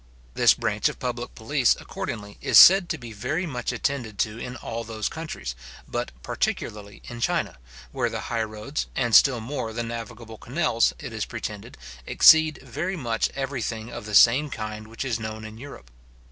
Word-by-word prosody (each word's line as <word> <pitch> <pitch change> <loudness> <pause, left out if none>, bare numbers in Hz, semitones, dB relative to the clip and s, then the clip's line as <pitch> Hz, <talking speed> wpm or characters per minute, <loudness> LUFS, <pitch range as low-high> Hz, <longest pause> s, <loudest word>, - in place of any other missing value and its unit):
This - - +5
branch - - 0
of - - -8
public - - -4
police, - - +2
accordingly, 105 -1 -6
is - - +4
said 190 -1 +9
to 160 - -1
be 120 -5 -10
very 130 - -2
much 125 -7 -3
attended 125 -3 -3
to 110 +1 -10
in 125 +1 -6
all 115 -2 -5
those 110 -2 -3
countries, 155 - -6 0.3
but - - -3
particularly 105 -1 -3
in 120 -1 -8
China, 65 - -1 0.3
where - - -1
the - - -4
high 115 -1 -2
roads, 110 +6 -4
and 120 -3 0
still 130 -1 +6
more 115 -1 -4
the 120 +1 -2
navigable 115 -1 -7
canals, 125 -4 +1
it - - -8
is - - -2
pretended, - - -7 0.3
exceed 160 -1 +6
very 155 +9 -4
much 115 -6 -1
every 135 -1 -3
thing 110 +1 -4
of 105 - -7
the 105 - -2
same 130 +8 +6
kind 110 -3 -6
which 115 +4 -6
is 120 -4 -1
known 110 0 -6
in 110 0 -10
Europe. 120 - -11
115 Hz, 180 wpm, -25 LUFS, 110-135 Hz, 0.3 s, said